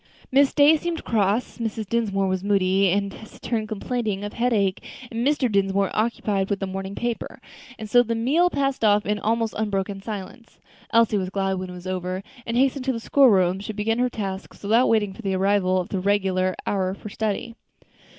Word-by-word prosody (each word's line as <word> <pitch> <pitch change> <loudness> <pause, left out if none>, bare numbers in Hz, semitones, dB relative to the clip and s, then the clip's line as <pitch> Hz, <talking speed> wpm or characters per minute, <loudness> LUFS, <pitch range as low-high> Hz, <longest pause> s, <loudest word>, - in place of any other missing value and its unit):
Miss 275 +1 +4
Day 295 +2 +5
seemed 335 +1 -4
cross, 215 +2 0
Mrs. 225 -2 -3
Dinsmore 195 -3 0
was 185 0 -1
moody 195 -1 +2
and 200 +2 0
taciturn, 220 +1 -5
complaining 215 -1 -3
of 205 - -5
headache, 215 -6 0 0.3
and 230 - -4
Mr. 290 -3 +2
Dinsmore 195 -2 +1
occupied 210 -3 0
with 200 -1 -1
the 195 - -2
morning 190 +1 -5
paper; 240 -1 -4 0.4
and 220 - -7
so 245 +3 +5
the 230 -1 -1
meal 290 +10 +2
passed 275 -5 -1
off 210 -1 +4
in 210 +1 0
almost 225 +1 0
unbroken 200 -2 -2
silence. 215 +3 -8 0.3
Elsie 230 -3 +4
was 185 -1 -3
glad 195 -1 -1
when 185 0 -5
it - - -8
was 180 0 -10
over, 185 0 -3 0.2
and 230 +1 -1
hastening 270 +1 +2
to 265 - +1
the 230 - -4
school 270 +3 +5
room, 185 -2 +3
she 205 +2 -6
began 225 +3 -1
her 250 0 +2
tasks 195 -4 -6
without 225 +5 +3
waiting 210 -3 +2
for 230 - -11
the 195 -3 -1
arrival 190 -1 +2
of 180 - -4
the 195 - -2
regular 185 -1 +1
hour 190 -2 -1
for 210 - -9
study. 220 +3 -3
205 Hz, 195 wpm, -24 LUFS, 195-230 Hz, 0.4 s, Day